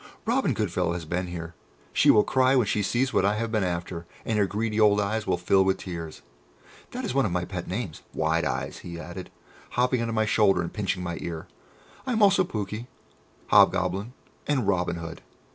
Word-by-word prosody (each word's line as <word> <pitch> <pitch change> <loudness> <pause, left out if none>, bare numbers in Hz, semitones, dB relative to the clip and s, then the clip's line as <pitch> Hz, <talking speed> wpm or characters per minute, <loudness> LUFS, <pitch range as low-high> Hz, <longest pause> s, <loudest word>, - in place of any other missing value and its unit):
'Robin 235 - +1
Goodfellow 90 -4 0
has 85 -2 -5
been 90 +3 -2
here!' 85 -1 -6 0.4
she - - +4
will 105 - +7
cry 130 0 +3
when 125 -4 +4
she 105 0 0
sees 125 +6 0
what - - +3
I 100 +2 +2
have 115 +1 -2
been 110 -3 +1
after, 85 -1 -3 0.2
and 110 -2 0
her 100 - +3
greedy 110 +2 -1
old 105 -1 +5
eyes 105 +2 -1
will - - +2
fill 95 +2 +3
with 95 0 +1
tears. 85 -4 -7 0.7
That - - -5
is - - -2
one 135 0 +3
of - - -4
my 90 0 -1
pet 90 -3 -6
names, 95 -4 -4
Wide 80 +1 +1
eyes," - - -3
he 85 -1 -8
added, 90 +1 -8 0.4
hopping 125 0 +2
on 115 - -1
to 115 - -3
my 110 -1 +2
shoulder 105 -3 +3
and 85 - -6
pinching 95 -4 -2
my 85 -1 -4
ear. 80 -2 -5 0.6
"I 255 - 0
am 220 -2 +3
also 195 -1 +5
Pouke, 105 - -4 0.6
Hobgoblin, 105 +6 +3 0.3
and 130 -8 +1
Robin 90 -3 +1
Hood. 85 -1 -7
100 Hz, 205 wpm, -26 LUFS, 90-115 Hz, 0.7 s, will